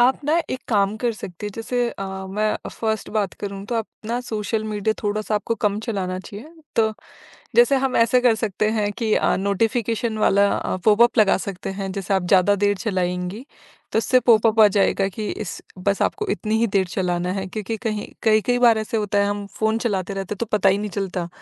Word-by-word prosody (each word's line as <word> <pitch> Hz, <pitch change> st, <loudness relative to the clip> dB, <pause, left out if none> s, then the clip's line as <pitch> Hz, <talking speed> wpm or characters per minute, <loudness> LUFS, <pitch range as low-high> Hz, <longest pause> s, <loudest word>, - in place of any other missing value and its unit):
आप 250 Hz, +2 st, +4 dB
ना 310 Hz, +3 st, +2 dB
एक 255 Hz, -, -3 dB
काम 205 Hz, -2 st, +2 dB
कर 235 Hz, +1 st, 0 dB
सकते 190 Hz, -2 st, -8 dB
हैं। -, -, -4 dB
जैसे 240 Hz, +2 st, -1 dB
अ, 195 Hz, -, -6 dB, 0.2 s
मैं 210 Hz, +3 st, 0 dB
फर्स्ट 220 Hz, -1 st, -2 dB
बात 205 Hz, -2 st, 0 dB
करूँ 200 Hz, -1 st, -5 dB
तो 240 Hz, -, -3 dB
आप 225 Hz, -1 st, -1 dB, 0.2 s
ना 240 Hz, +2 st, -1 dB
सोशल 220 Hz, -2 st, -3 dB
मीडिया 215 Hz, 0 st, -1 dB
थोड़ा-सा 215 Hz, +1 st, -1 dB
आपको 210 Hz, +2 st, -1 dB
कम 205 Hz, 0 st, +2 dB
चलाना 185 Hz, -4 st, -2 dB
चाहिए। 210 Hz, -, -10 dB, 0.2 s
तो 220 Hz, -1 st, +3 dB, 0.6 s
जैसे 240 Hz, +3 st, +6 dB
हम 260 Hz, -1 st, 0 dB
ऐसे 235 Hz, +2 st, +4 dB
कर 245 Hz, -2 st, +4 dB
सकते 215 Hz, -1 st, -1 dB
हैं 205 Hz, -1 st, +1 dB
कि 220 Hz, -2 st, 0 dB
अ, -, -, +2 dB
नोटिफिकेशन 220 Hz, +3 st, 0 dB
वाला 200 Hz, -1 st, +4 dB
अ, -, -, -2 dB
पॉपअप 230 Hz, +3 st, +4 dB
लगा 210 Hz, -2 st, +5 dB
सकते 195 Hz, -1 st, -5 dB
हैं। 195 Hz, -, -3 dB
जैसे 195 Hz, 0 st, -2 dB
आप 190 Hz, -, +1 dB
ज़्यादा 195 Hz, +2 st, +5 dB
देर 205 Hz, 0 st, +2 dB
चलाएँगी 180 Hz, +3 st, -2 dB, 0.5 s
तो 220 Hz, -, +2 dB
इससे 255 Hz, +3 st, +3 dB
पॉपअप 225 Hz, -2 st, +4 dB
आ 215 Hz, -, +9 dB
जाएगा 195 Hz, 0 st, +2 dB
कि 210 Hz, +2 st, -5 dB
इस 215 Hz, -, -5 dB, 0.2 s
बस 200 Hz, +2 st, 0 dB
आपको 425 Hz, 0 st, -1 dB
इतनी 215 Hz, 0 st, -1 dB
ही 235 Hz, -, +3 dB
देर 195 Hz, -2 st, +1 dB
चलाना 180 Hz, -1 st, -1 dB
है। 190 Hz, 0 st, -3 dB
क्योंकि 215 Hz, +3 st, -4 dB
कहीं 215 Hz, -2 st, -3 dB
कई-कई 220 Hz, +2 st, +3 dB
बार 235 Hz, -2 st, +5 dB
ऐसा 220 Hz, +1 st, -2 dB
होता 205 Hz, -1 st, 0 dB
है 200 Hz, -, +3 dB
हम 205 Hz, 0 st, -3 dB
फ़ोन 220 Hz, +1 st, +1 dB
चलाते 200 Hz, -4 st, -2 dB
रहते 195 Hz, +1 st, -4 dB
हैं -, -, -18 dB
तो 235 Hz, -, -1 dB
पता 195 Hz, -1 st, +3 dB
ही 195 Hz, -, +3 dB
नहीं 210 Hz, 0 st, -4 dB
चलता 185 Hz, -2 st, -3 dB
210 Hz, 210 wpm, -22 LUFS, 195-225 Hz, 0.6 s, आ